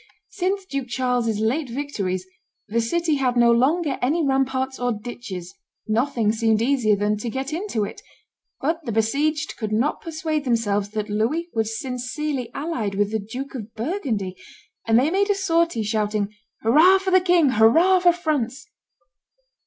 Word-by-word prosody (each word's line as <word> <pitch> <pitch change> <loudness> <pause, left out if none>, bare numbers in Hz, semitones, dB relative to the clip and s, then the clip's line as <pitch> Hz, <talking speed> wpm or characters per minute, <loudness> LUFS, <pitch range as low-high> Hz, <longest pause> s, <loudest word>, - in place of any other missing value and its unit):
Since 390 0 -1
Duke 275 -7 -4
Charles's 245 -3 0
late 255 +6 0
victories, 205 -9 -3 0.4
the 230 +2 0
city 315 +6 0
had 250 -2 0
no 235 0 +6
longer 280 +5 +2
any 305 +6 +1
ramparts 265 -1 0
or 245 0 0
ditches; 210 -5 -7 0.3
nothing 230 -1 +1
seemed 225 -1 +2
easier 235 -3 +2
than 210 +1 0
to 230 +3 -4
get 265 +5 -4
into 330 - -2
it; 200 - -6 0.6
but 325 +4 -1
the 240 - -4
besieged 280 +8 0
could 215 -2 -4
not 235 +8 0
persuade 315 -2 -2
themselves 210 -5 0
that 215 0 -3
Louis 270 +12 0
was 225 0 -1
sincerely 255 +1 -3
allied 250 -10 -2
with 205 +1 +1
the 220 - 0
Duke 245 +7 -7
of 220 -4 -8
Burgundy, 225 - -2 0.5
and 225 0 +5
they 275 +6 +3
made 400 +3 +1
a 410 - +3
sortie, 335 - +1
shouting, 210 -1 -1 0.3
"Hurrah 315 +12 +6
for 380 0 -2
the 370 0 +6
king! 350 -5 +4
Hurrah 320 - +5
for 355 -1 +5
France!" 285 -7 -2
250 Hz, 160 wpm, -23 LUFS, 220-310 Hz, 0.6 s, no